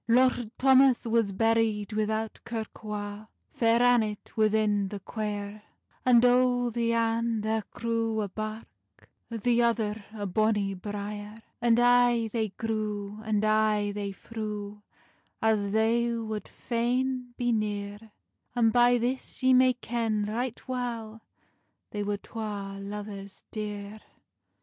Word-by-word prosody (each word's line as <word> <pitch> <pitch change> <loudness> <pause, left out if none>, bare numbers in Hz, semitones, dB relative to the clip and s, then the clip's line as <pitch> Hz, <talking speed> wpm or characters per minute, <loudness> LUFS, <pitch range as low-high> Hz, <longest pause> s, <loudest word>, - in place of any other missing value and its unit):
Lord 245 -1 +3
Thomas 265 -2 +5
was 230 -3 +2
buried 225 0 +1
without 220 +1 -1
kirk 225 -1 -6
wa, 210 0 -5 0.3
Fair 230 +1 +3
Annet 225 -4 +1
within 215 -2 +2
the 205 +1 -6
quiere, 205 0 -4 0.4
And 245 -1 +6
o 245 -1 +3
the 230 0 0
ane 230 -1 +1
thair 220 0 0
grew 230 -1 -1
a 205 - -1
birk, 215 +3 -8 0.2
The 235 +1 +1
other 220 -3 0
a 210 -2 -5
bonny 205 0 +1
briere. 205 +2 -6 0.3
And 235 -1 +4
ay 245 -2 +4
they 220 -2 0
grew, 210 -1 -3
and 215 -1 +1
ay 215 -1 +2
they 200 -1 -4
threw, 210 -1 -6 0.6
As 215 -2 +2
they 225 +3 +2
wad 220 -2 -4
faine 250 +1 -1
be 245 -1 +1
neare; 210 0 -3 0.4
And 225 -2 +3
by 245 0 +5
this 255 +2 -3
ye 260 0 +6
may 255 0 +6
ken 230 -3 -1
right 235 +5 -3
weil 230 -3 -4 0.7
They 205 - -3
were 205 0 -1
twa 200 -2 -6
luvers 200 -1 -7
deare. 210 -1 -5
220 Hz, 125 wpm, -28 LUFS, 210-235 Hz, 0.7 s, And